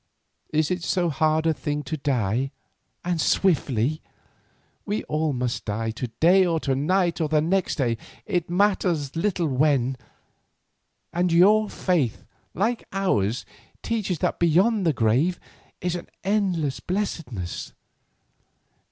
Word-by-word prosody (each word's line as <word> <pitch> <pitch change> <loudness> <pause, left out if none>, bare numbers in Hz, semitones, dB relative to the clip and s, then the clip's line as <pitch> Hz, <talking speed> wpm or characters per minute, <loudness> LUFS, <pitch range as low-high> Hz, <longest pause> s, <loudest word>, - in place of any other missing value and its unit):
Is 155 +1 +1
it 180 -1 -1
so 175 -3 +1
hard 155 +2 +1
a 160 - +3
thing 150 -1 -3
to 140 +3 -3
die, 130 -3 0 0.6
and 175 -2 0
swiftly? 150 - +1 0.8
We 210 +1 -2
all 155 0 -1
must 125 -2 -2
die, 110 +2 -2
to 125 +3 -4
day, 185 +4 +6
or 170 -3 +1
to 135 - 0
night, 170 +5 +1
or 155 - 0
the 155 0 +3
next 180 +5 +1
day, 120 -6 0 0.3
it 180 -6 -1
matters 175 -6 +1
little 175 -1 0
when—and 135 +5 -3
your 205 +5 +5
faith, 160 - 0 0.3
like 225 +7 0
ours, 125 - 0 0.4
teaches 210 -6 -1
that - - -1
beyond 185 +4 +3
the - - +5
grave 130 +10 +2 0.4
is 180 0 -1 0.3
endless 185 -8 0
blessedness. 160 - -4
160 Hz, 125 wpm, -24 LUFS, 135-185 Hz, 0.8 s, day